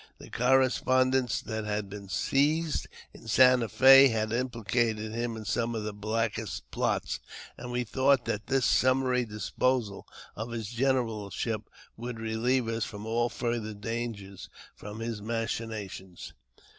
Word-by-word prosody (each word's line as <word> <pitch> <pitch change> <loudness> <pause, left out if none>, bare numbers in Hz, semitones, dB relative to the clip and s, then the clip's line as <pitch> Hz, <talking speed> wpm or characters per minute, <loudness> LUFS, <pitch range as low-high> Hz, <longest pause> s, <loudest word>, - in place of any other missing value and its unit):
The - - -13
correspon 130 0 +3
dence 130 -3 +1
that 110 -1 -4
had 105 -1 -2
been 100 0 -9
seized 150 - +1 0.3
in - - -14
Santa 125 0 +5
Fe 135 +5 +8
had 110 -3 -1
implicated 115 -2 -1
him 115 0 -2
in 110 - -8
some 115 +2 -1
of 110 - -3
the 105 0 -4
blackest 110 +1 -3
plots, - - -1 0.4
and 125 - -8
we 125 0 0
thought 130 +2 +2
that 110 -2 -3
this 135 -1 +2
summary 130 -1 +3
disposal 105 0 -1 0.3
of 110 +3 -5
his 115 -3 -4
generalship 115 -4 -1 0.3
would 120 +1 -5
reheve 115 +3 0
us 115 -1 -1
from 105 -1 -7
all 120 +2 +1
further 115 -3 -3
danger 110 -2 -5 0.4
from 105 +2 -8
his 115 -2 -4
machinations. 110 -4 -5
115 Hz, 140 wpm, -29 LUFS, 110-125 Hz, 0.4 s, Fe